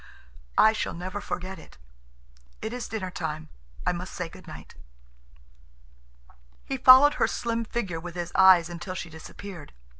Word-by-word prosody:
I 220 - +6
shall 220 - -3
never 185 +4 -5
forget 185 -1 -5
it. - - -16 0.8
It 220 - -5
is 245 -1 -5
dinner 190 -5 -4
time. 155 -3 -5 0.4
I - - +3
must 180 +1 -6
say 180 -2 -4
good - - -15
night." - - -11 1.9
He 270 - -3
followed 260 +3 +8
her - - +5
slim 230 -1 -2
figure 195 -8 -3
with 175 +1 -8
his 175 -1 -4
eyes 185 -3 +7
until 175 +2 -6
she 170 -3 -6
disappeared. 160 +1 -10
185 Hz, 150 wpm, -27 LUFS, 170-220 Hz, 1.9 s, followed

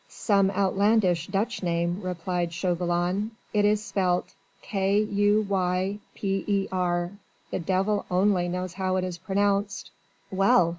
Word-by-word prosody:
"Some 200 -3 +2
outlandish 195 -2 +2
Dutch 210 +5 -1
name," 170 0 0
replied 175 -1 -2
Chauvelin. 175 +3 0 0.2
"It 205 -1 +3
is 210 0 +2
spelt 180 -3 0 0.3
K 195 0 +1
U 205 0 +2
Y 190 +1 0 0.2
P 195 -1 -1
E 200 -2 +1
R. 175 -1 0 0.4
The - - -1
devil 195 +4 0
only 180 -1 +2
knows 180 0 -3
how 185 0 -1
it 185 - 0
is 180 -2 -4
pronounced." 200 +2 0 0.4
"Well! 190 -3 +4
190 Hz, 135 wpm, -26 LUFS, 180-200 Hz, 0.4 s, Well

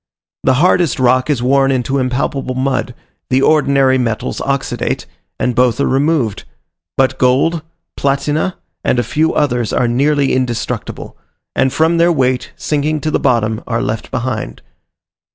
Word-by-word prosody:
The 130 - +3
hardest 170 -1 +2
rock 130 +2 +2
is 135 -5 0
worn 135 +1 +3
into 135 +1 0
impalpable 130 0 -2
mud, 130 -1 -1 0.3
the 130 +1 +2
ordinary 140 -3 +3
metals 115 -3 -2
oxidate, 140 0 -2 0.3
and 125 - 0
both 125 +1 +2
are 140 - +2
removed; 135 -6 0 0.5
but 130 0 +1
gold, 140 +6 +2 0.3
platina, 145 +5 0 0.3
and - - +1
a 120 - +2
few 155 +5 0
others 125 -6 0
are 120 - +1
nearly 140 +3 +2
indestructible, 125 -3 -3 0.4
and 130 - +2
from 160 +4 +2
their 170 +1 +4
weight, 130 -5 0
sinking 150 +1 -1
to 155 - -1
the - - +1
bottom, 110 -1 +1
are 115 0 -1
left 115 -4 -3
behind. 115 - -4
130 Hz, 145 wpm, -16 LUFS, 125-145 Hz, 0.5 s, their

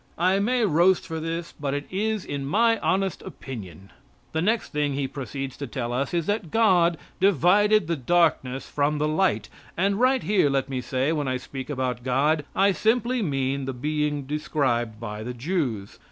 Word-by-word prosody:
I 185 +3 +3
may 240 +3 +2
roast 175 +1 +3
for 160 -2 -4
this, 165 +1 -4
but 140 -1 -2
it 145 0 -3
is 215 +1 -1
my 205 +12 +1
honest 190 -1 0
opinion. 100 - -9 0.4
The 160 - -1
next 220 +6 0
thing 145 -1 0
he 140 -1 -1
proceeds 135 0 -6
to 140 - -5
tell 120 -1 -3
us 135 +3 -1
is 170 -2 0
that 205 -3 -1
God 175 -5 +3 0.2
divided 200 +3 +4
the 170 +1 -1
darkness 135 -3 +1
from 150 +1 0
the 150 +1 +1
light, 155 - +1 0.3
and 195 +3 +1
right 255 +1 +3
here 195 -8 +3
let 135 0 0
me 130 -2 -2
say 130 +3 0
when 150 -3 -1
I 130 0 0
speak 130 +2 -8
about 130 -4 -2
God 145 +4 +2
I 195 +1 +4
simply 235 +5 +1
mean 135 -5 -1
the 135 - -3
being 150 +2 -1
described 130 -6 -1
by 105 -2 -6
the 125 +2 -5
Jews. 125 - -3
150 Hz, 180 wpm, -25 LUFS, 130-190 Hz, 0.4 s, divided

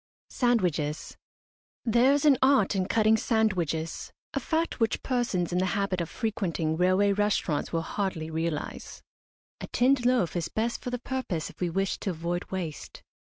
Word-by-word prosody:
SANDWICHES. 175 - 0 0.7
There 240 +3 +4
is 285 +1 +2
an 280 -4 +5
art 260 -7 +4
in 185 -1 0
cutting 220 0 +3
sandwiches 185 - -1 0.2
a - - 0
fact 325 -2 -1
which 225 -2 0
persons 235 -10 0
in 180 - +2
the 185 - +1
habit 195 -3 0
of 170 - -4
frequenting 180 -8 -2
railway 185 +4 +3
restaurants 200 -7 0
will 165 -1 -1
hardly 165 -5 -3
realise. 160 -1 -4 0.6
A - - -6
tinned 255 +1 +2
loaf 245 -10 +2
is 165 -2 -2
best 230 +2 -2
for - - -4
the 245 - -2
purpose 245 - -3
if - - -25
we 180 - +1
wish 195 +3 -1
to - - -3
avoid 175 +1 -3
waste. 175 -5 -6
195 Hz, 160 wpm, -28 LUFS, 170-235 Hz, 0.7 s, an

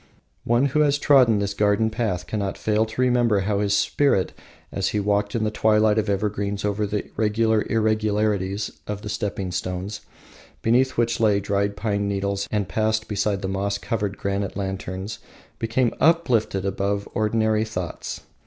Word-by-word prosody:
One 120 +3 +3
who 140 +2 +1
has 145 -1 +3
trodden 130 -7 +5
this 100 0 -1
garden 105 +2 +2
path 105 -6 -2
cannot 100 -3 -3
fail 110 +1 +1
to 110 +3 -3
remember 120 -5 +3
how 100 +1 0
his 100 -1 +2
spirit, 135 -5 +1 0.4
as - - -1
he 105 - 0
walked 105 +1 0
in 115 - 0
the 105 - 0
twilight 110 0 +3
of 110 -1 -1
evergreens 100 0 -1
over 105 0 0
the 105 0 -4
regular 110 0 +2
irregularities 105 -2 0 0.2
of 105 0 -5
the 105 - -5
stepping 100 -3 -3
stones, 90 +3 -4 0.6
beneath 130 +3 +2
which 115 0 +1
lay 105 -3 +3
dried 100 0 -1
pine 100 -2 -1
needles, 100 0 -1
and 105 -3 -1
passed 110 +1 0
beside 100 -1 -1
the - - -1
moss 100 +1 -1
covered 105 -2 -3
granite 100 0 -2
lanterns, 95 +1 -4 0.4
became 115 +1 +1
uplifted 125 - +2
above 100 +1 -1
ordinary 110 0 +1
thoughts. 90 -6 -5
105 Hz, 160 wpm, -23 LUFS, 100-110 Hz, 0.6 s, trodden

